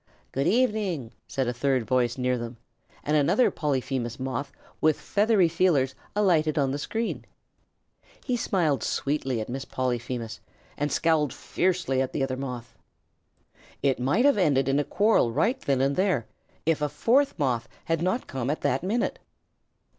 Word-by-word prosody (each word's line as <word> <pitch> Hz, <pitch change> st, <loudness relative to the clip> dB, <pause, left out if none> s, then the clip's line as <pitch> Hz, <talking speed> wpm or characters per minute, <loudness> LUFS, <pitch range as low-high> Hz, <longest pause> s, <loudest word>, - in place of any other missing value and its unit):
"Good 135 Hz, +1 st, 0 dB
evening," 205 Hz, -, +1 dB, 0.2 s
said 135 Hz, -2 st, -1 dB
a 120 Hz, -, 0 dB
third 130 Hz, -1 st, 0 dB
voice 120 Hz, +1 st, +1 dB
near 125 Hz, 0 st, +1 dB
them, 120 Hz, 0 st, -6 dB, 0.5 s
and 150 Hz, -, +1 dB
another 150 Hz, -, +3 dB
Polyphemus 130 Hz, -4 st, -2 dB
Moth 130 Hz, +1 st, -3 dB, 0.3 s
with 155 Hz, -1 st, +3 dB
feathery 205 Hz, -3 st, +3 dB
feelers 165 Hz, -6 st, +2 dB, 0.2 s
alighted 165 Hz, -7 st, +2 dB
on 135 Hz, -2 st, +2 dB
the 140 Hz, -, -2 dB
screen. 225 Hz, +9 st, -3 dB, 1.0 s
He 250 Hz, -, 0 dB
smiled 165 Hz, -, +1 dB
sweetly 135 Hz, -3 st, -1 dB
at 110 Hz, -, -4 dB
Miss 130 Hz, +2 st, -4 dB
Polyphemus 120 Hz, -3 st, -3 dB, 0.4 s
and 145 Hz, 0 st, -2 dB
scowled 155 Hz, -3 st, +2 dB
fiercely 175 Hz, -8 st, 0 dB
at 130 Hz, -, -2 dB
the 140 Hz, -, 0 dB
other 130 Hz, -1 st, -1 dB
Moth. 125 Hz, -3 st, -6 dB, 1.1 s
It 135 Hz, -3 st, +2 dB
would 145 Hz, -, +2 dB
have 285 Hz, -7 st, +4 dB
ended 135 Hz, -7 st, +3 dB
in 135 Hz, +1 st, +2 dB
a -, -, +2 dB
quarrel 205 Hz, -, +2 dB
right 225 Hz, -, +1 dB
then 135 Hz, -2 st, +1 dB
and 140 Hz, +1 st, +2 dB
there, 185 Hz, -, +1 dB, 0.4 s
if 160 Hz, -1 st, +1 dB
a 150 Hz, -, +1 dB
fourth 250 Hz, -, +2 dB
Moth 130 Hz, -5 st, 0 dB, 0.2 s
had 165 Hz, -1 st, 0 dB
not 185 Hz, +8 st, 0 dB
come 130 Hz, -1 st, -3 dB
at 150 Hz, -, -1 dB
that 130 Hz, +2 st, +1 dB
minute. 230 Hz, -, -1 dB
140 Hz, 160 wpm, -26 LUFS, 130-180 Hz, 1.1 s, have